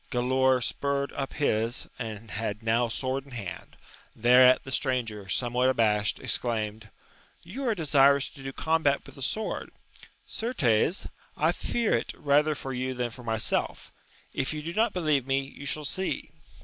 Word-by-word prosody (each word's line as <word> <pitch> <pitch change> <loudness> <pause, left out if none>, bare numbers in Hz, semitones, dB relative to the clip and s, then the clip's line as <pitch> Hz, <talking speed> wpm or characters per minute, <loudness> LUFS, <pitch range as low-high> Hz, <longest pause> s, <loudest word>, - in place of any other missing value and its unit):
Gkdaor 130 0 +2
spurred 140 +2 -1
up 135 -1 -4
his, 115 -5 0
and 110 -2 -6
had 105 0 -3
now; 115 +2 +2
sword 130 +3 -2
in 140 -1 -15
hand; 100 -7 -7 0.4
thereat, 125 +2 +6
the 130 - -8
stranger, 115 -7 -1
somewhat 125 +3 +1
abashed, 105 -4 +2
exclaimed. 110 -2 -2 0.5
You 255 +11 -5
are 225 - +2
desirous 140 -4 +4
to 140 - -14
do 135 0 -5
combat 160 -1 +1
with - - -12
the 135 - -12
sword; 215 - -2 0.6
certes, 175 - +1 0.3
I - - +3
fear 235 -2 0
it - - -3
rather 150 +1 +3
for 135 -1 -5
you 130 +1 -2
than 120 -1 -2
for 125 - -10
myself: 110 -2 -1 0.4
if 140 +3 -1
you 150 - -5
do 165 +2 -4
not 220 +3 +2
believe 155 -8 +1
me, 135 0 +2
you 135 +1 -9
shall 150 0 -2
see. 185 +7 -2
130 Hz, 160 wpm, -28 LUFS, 115-145 Hz, 0.6 s, thereat